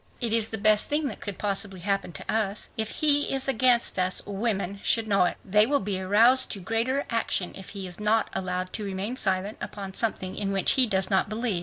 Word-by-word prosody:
"It 235 -3 -1
is 225 -1 +2
the 220 - -3
best 215 0 +3
thing 295 +1 +1
that - - -8
could 205 -2 -6
possibly 195 -2 -2
happen 195 -1 -1
to - - -5
us. 215 -2 -2
If 220 -1 -2
he 290 -1 +2
is 270 0 0
against 245 -5 +3
us, 185 0 +1
women 200 -2 -3
should 225 -1 +1
know 195 -3 +3
it. - - -2
They 210 +2 +4
will 285 +1 +2
be 195 -1 -3
aroused 230 +7 +4
to 200 - -4
greater 230 +8 -1
action 225 -5 -1
if 190 - -10
he 195 - -4
is 180 +1 -5
not 215 +1 +2
allowed 185 0 -3
to 215 - -4
remain 200 +4 -4
silent 195 -2 -1
upon 195 -2 -7
something 190 -4 -2
in 200 -1 -2
which 195 -1 +2
he 260 -3 +4
does 190 -2 0
not 190 +1 +2
believe. 215 -3 0
205 Hz, 220 wpm, -26 LUFS, 190-230 Hz, -, They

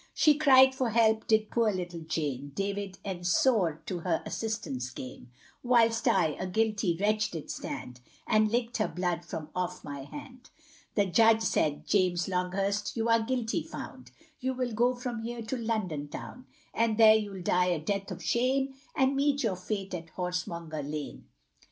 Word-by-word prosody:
She 305 - +5
cried 265 -3 +6
for 260 -2 -1
help, 220 -1 +3
did 220 -1 +2
poor 230 -2 +2
little 175 -3 -4
Jane, 145 -4 -3
David 200 -1 -3
Ensor 180 - +1
to 180 -3 -3
her 165 -1 -1
assistance 135 - -3
came; 125 0 -9 0.3
Whilst 230 -2 +3
I, 160 - +4
a 185 - -2
guilty 210 -3 0
wretch 215 +1 +1
did 160 -3 -6
stand, 125 -1 -6 0.2
And 215 -1 +3
licked 235 0 0
her 215 - +1
blood 175 -2 -2
from 160 -2 -6
off 180 0 -3
my 140 -2 -7
hand 255 - -11 0.5
The 205 - +3
Judge 225 +4 +4
said, 150 -7 0
James 180 -3 +2
Longhurst, 195 +4 -1
you 225 +1 0
are 230 0 +4
guilty 235 -1 -1
found, - - -9 0.3
You 260 +1 -2
will 250 -2 -2
go 245 +3 +2
from 245 -2 -4
here 235 0 -5
to 220 +4 -3
London 215 - -2
town 255 - -9 0.3
And 225 -1 +1
there 220 -1 +8
you'll 205 -4 -2
die 180 +1 +3
a 175 -3 +1
death 195 +5 -2
of - - -7
shame, 265 +3 +1 0.2
And 270 0 +2
meet 280 0 +1
your 210 -5 +1
fate 195 +1 -4
at 165 -2 -7
Horsemonger 175 -3 -3
lane. 150 +1 -6
205 Hz, 170 wpm, -29 LUFS, 175-230 Hz, 0.5 s, there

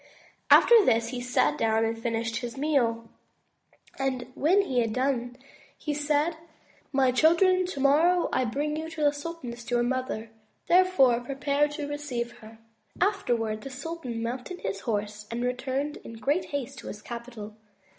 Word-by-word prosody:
'' - - -37
After 470 -3 +6
this, 230 -7 +2
he 250 0 -4
sat 150 -12 +1
down 225 0 +2
again 225 - 0
and 225 - -11
finished 230 -1 -1
his 240 +2 -5
meal, 240 -6 +1 0.9
and 265 -2 -1
when 365 +10 +3
he 260 -10 0
had 225 -2 0
done, 250 -1 -1 0.4
he 300 - -3
said, 300 +2 0 0.5
"My 265 -2 +3
children, 355 +7 +4
tomorrow 320 +4 +3
I 260 - +2
will - - -2
bring 295 +4 -1
to - - -2
you 320 - -6 0.2
the 290 - +5
sultaness, 285 -6 -7
your 240 0 +2
mother. 245 -3 -2 0.3
Therefore 350 -10 +4
prepare 280 +3 0
to 295 0 -5
receive 275 -5 -4
her." 220 0 -13 0.4
Afterwards 240 - 0
the 275 - -6
sultan 270 -4 -5
mounted 250 +10 -5
his 195 +1 -3
horse 210 -1 -3
and 235 +1 -3
returned 260 +4 -2
in - - -11
great 285 +10 0
haste 275 -1 -5
to - - -10
his 210 0 -8
capital. 235 -3 -8
255 Hz, 165 wpm, -27 LUFS, 230-295 Hz, 0.9 s, After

